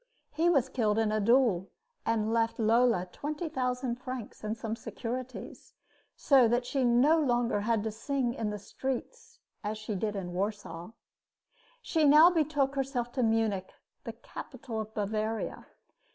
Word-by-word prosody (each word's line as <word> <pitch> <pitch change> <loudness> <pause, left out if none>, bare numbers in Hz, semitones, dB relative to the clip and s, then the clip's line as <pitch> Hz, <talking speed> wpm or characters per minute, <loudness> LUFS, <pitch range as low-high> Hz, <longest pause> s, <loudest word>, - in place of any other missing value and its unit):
He 325 +3 +2
was 275 -7 +3
killed 220 -5 0
in 220 -1 +2
a 215 - +1
duel 220 -4 +3 0.4
and 225 -1 +1
left 230 0 +1
Lola 230 -3 +3
twenty 305 +3 -4
thousand 250 -2 -2
francs 255 -4 -7
and 215 +1 -3
some 225 0 -3
securities, 250 +2 -7 0.4
so 265 -4 +5
that 240 +2 +1
she 270 +1 0
no 250 +7 +4
longer 240 -6 +1
had 220 0 +1
to 220 - -2
sing 245 +2 -1
in 225 -5 -2
the 210 - -4
streets 270 - -5 0.3
as 215 +1 -3
she 215 0 -5
did 210 +2 -2
in 180 -3 -4
Warsaw. 195 -3 -4 0.9
She 320 -2 +1
now 305 +5 +8
betook 295 -5 +1
herself 265 -3 -2
to 255 - -1
Munich, 220 -5 +1 0.3
the - - -6
capital 250 - -7
of 215 0 -8
Bavaria. 215 +1 -2
235 Hz, 150 wpm, -30 LUFS, 215-270 Hz, 0.9 s, now